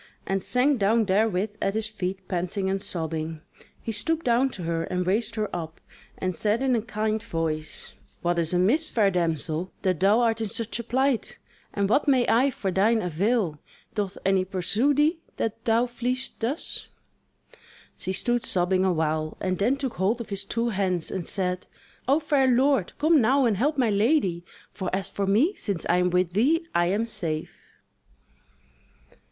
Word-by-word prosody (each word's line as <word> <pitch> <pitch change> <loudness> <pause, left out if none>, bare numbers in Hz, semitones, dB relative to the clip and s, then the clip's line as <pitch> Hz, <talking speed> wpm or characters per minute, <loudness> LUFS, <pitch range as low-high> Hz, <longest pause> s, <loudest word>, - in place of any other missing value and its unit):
and 195 0 -1
sank 255 +5 +2
down 220 +3 +3
therewith 205 0 +1
at 195 - 0
his 220 0 0
feet 190 -3 -5
panting 185 +1 -1
and 195 0 -1
sobbing. 160 -2 -3 0.4
He 225 - -3
stooped 320 +10 -1
down 245 +2 +3
to 180 - -6
her, 165 0 -1
and 180 -1 -2
raised 215 +5 0
her 215 -1 -1
up, 165 -2 -6 0.4
and 185 -1 -2
said 215 +7 0
in 260 -2 +3
a 225 - +1
kind 215 0 -2
voice: 155 -3 -3 0.3
"What 175 0 +1
is 165 -1 0
amiss, 215 - +3
fair 205 -4 +2
damsel, 170 0 -1
that 185 -3 +1
thou 205 +5 +4
art 225 -1 +1
in 220 - -2
such 230 +3 -3
a - - -3
plight; 260 +1 0 0.3
and 200 -1 0
what 260 +9 +2
may 260 -3 +4
I 255 +5 +4
for 200 -7 -3
thine 215 +5 +3
avail? 180 -1 0 0.3
Doth 205 -3 -3
any 195 -1 +3
pursue 200 +9 +1
thee, 310 +4 +2 0.2
that 225 0 -3
thou 230 +1 +3
fleest 250 +2 -3
thus?" 250 +8 -3 1.1
She 190 - -3
stood 240 +5 0
sobbing 185 -2 +1
awhile, 155 -3 0
and 185 -1 -2
then 240 +7 +2
took 270 -3 -4
hold 200 +6 +1
of 235 - -7
his 200 -1 -1
two 230 +3 -1
hands 185 -5 -1
and 185 -3 -3
said: 180 -2 -2 0.4
"O 280 +4 +4
fair 290 -4 +2
lord, 260 -4 +2
come 310 -1 +4
now 265 +4 +3
and 225 -3 +2
help 290 +9 0
my 245 -5 +2
lady! 200 - +2 0.3
for 185 -3 -3
as 195 0 -2
for 200 -1 -2
me, 240 - +3
since 200 - -3
I 175 - +3
am 180 0 +2
with 180 -1 +1
thee, 305 - +2
I 175 0 +3
am 205 +5 +1
safe." 170 -9 -3
205 Hz, 180 wpm, -26 LUFS, 180-240 Hz, 1.1 s, thou